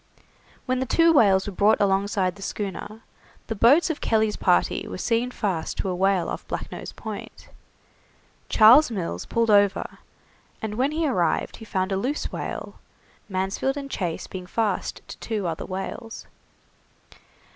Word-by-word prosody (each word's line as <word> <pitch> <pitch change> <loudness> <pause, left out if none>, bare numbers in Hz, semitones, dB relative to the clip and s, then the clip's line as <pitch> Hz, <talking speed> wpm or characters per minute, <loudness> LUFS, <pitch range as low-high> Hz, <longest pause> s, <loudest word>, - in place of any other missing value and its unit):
When 255 0 0
the 260 - -2
two 330 +7 +4
whales 195 -9 +4
were 205 - -5
brought 205 +3 +3
alongside 195 -2 +1
the 200 - -14
schooner, 205 +2 -5 0.4
the - - -3
boats 280 - +5
of 295 - -6
Kelly's 220 -1 +1
party - - +1
were - - -6
seen 235 +1 0
fast 190 -9 -3
to 195 - -2
a 180 - -1
whale 190 -1 +2
off - - -6
Black - - -5
Nose - - -7
Point. - - -9 1.0
Charles 245 +8 +7
Mills 170 - -4
pulled 230 -1 +1
over, 205 -1 +2 0.6
and 220 -1 -4
when 255 +6 +1
he 315 +1 -1
arrived 180 -11 0
he 225 - -11
found 185 -2 -2
a 190 - +1
loose 260 +9 -2
whale, - - -6 0.5
Mansfield 195 +8 -1
and 275 -1 -6
Chase 175 -4 -3
being 185 -1 -8
fast 220 +2 -2
to - - -10
two 215 -4 -3
other 165 -2 -3
whales. 205 +5 -6
210 Hz, 155 wpm, -24 LUFS, 190-240 Hz, 1.0 s, Charles